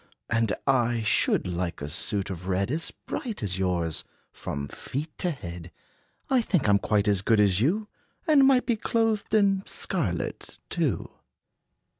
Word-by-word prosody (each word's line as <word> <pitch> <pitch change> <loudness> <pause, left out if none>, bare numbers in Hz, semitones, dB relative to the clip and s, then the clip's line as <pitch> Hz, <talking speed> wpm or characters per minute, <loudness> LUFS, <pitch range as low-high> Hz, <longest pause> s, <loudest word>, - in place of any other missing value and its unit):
And 115 -1 +2
I 120 -4 +2
should 105 - +2
like 90 -1 -3
a 70 - -4
suit 95 +5 0
of 90 0 -7
red 95 +4 0
As 160 +3 0
bright 225 - -5
as 95 -2 -1
yours, 85 -4 0 0.3
from 70 -1 -5
feet 150 - -5
to 180 - +1
head. 85 - -7 0.6
I 260 -2 +3
think 180 - +1
I' - - +5
m 100 - +5
quite 105 0 +1
as 100 -2 +3
good 110 +2 +3
as 100 -1 +4
you, 200 - +1 0.4
And 290 -5 +6
might 260 -2 +4
be 235 -3 +1
clothed 225 -1 0
in 200 -2 +4
scarlet, - - -3
too." - - -1
110 Hz, 160 wpm, -27 LUFS, -, 0.6 s, And